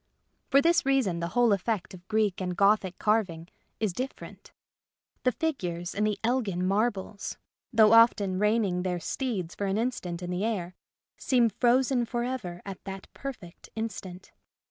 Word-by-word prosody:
For 275 +1 +5
this 340 +1 +4
reason 265 -11 +1
the 170 - -2
whole 240 -3 +5
effect 200 -1 -2
of 180 0 -13
Greek 215 -4 +1
and 180 -1 -3
Gothic 200 -2 +3
carving 185 -6 0 0.3
is 215 -5 0
different. 255 +8 -7 0.7
The 255 - +2
figures 180 - -3
in 210 - 0
the 210 -1 0
Elgin 220 -7 0
marbles, 200 0 -1 0.3
though 220 -2 +6
often 210 -5 +5
reining 210 -4 +2
their 180 -1 -1
steeds 190 - -3
for 200 - -3
an 195 +1 0
instant 185 -7 -2
in 175 - -4
the 180 +2 -1
air, 190 -6 -2 0.5
seem 245 -3 +3
frozen 245 +2 +2
for 240 +1 -2
ever 210 -9 -4
at 195 -2 -8
that 195 -1 -8
perfect 220 -11 -8
instant. 200 -5 -6
210 Hz, 155 wpm, -28 LUFS, 180-240 Hz, 0.7 s, though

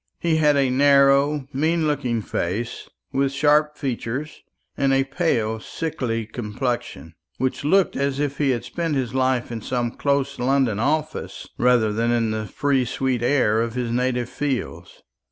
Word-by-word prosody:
He 165 -2 +1
had 150 -2 +4
a 135 -2 +2
narrow 140 +1 +4
mean 160 +4 +1
looking 125 -7 -1
face, 100 +8 -3 0.2
with 135 0 +1
sharp 150 +2 +2
features, 135 +2 -4 0.3
and 135 -1 +1
a 135 0 +3
pale 125 -7 -1
sickly 115 -5 -3
complexion, 115 -5 -4 0.2
which 130 +2 -2
looked 190 +6 +3
as 140 0 -1
if 145 -1 -2
he 145 -2 +2
had 120 -3 -1
spent 165 -3 -2
his 130 -3 -2
life 130 -2 0
in 115 -1 -5
some 120 +1 -2
close 140 +1 -1
London 125 -4 +1
office 155 +5 -2
rather 120 -3 +3
than 115 +2 0
in 115 -2 +1
the 110 0 -3
free 140 +1 +1
sweet 125 0 -1
air 120 -4 +2
of 115 0 -3
his 125 -2 -2
native 125 0 0
fields. 135 -1 -4
130 Hz, 155 wpm, -23 LUFS, 120-145 Hz, 0.3 s, had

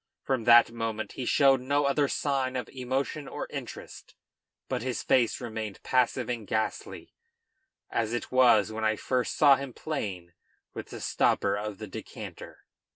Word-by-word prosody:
From 130 -4 -1
that 120 -1 +7
moment 115 -1 -4
he 130 - -5
showed 135 -2 +4
no 140 +3 +1
other 140 +1 +2
sign 135 -2 -1
of 125 - -3
emotion 135 +3 -3
or - - -5
interest, - - -8 0.5
but - - -2
his 125 0 -3
face 120 -3 +2
remained 110 -4 -5
passive 125 -1 +1
and 115 -4 -4
ghastly, 110 0 -3 0.8
as 115 -1 0
it 120 - -4
was 120 -5 +5
when 110 0 -4
I 110 0 +2
first 125 +3 -1
saw 140 -3 +7
him 140 -2 -6
playing 95 - -5 0.4
with - - -7
the - - -9
stopper 100 - +1
of 105 0 -4
the 110 - -7
decanter. 95 - -9
120 Hz, 155 wpm, -28 LUFS, 110-135 Hz, 0.8 s, that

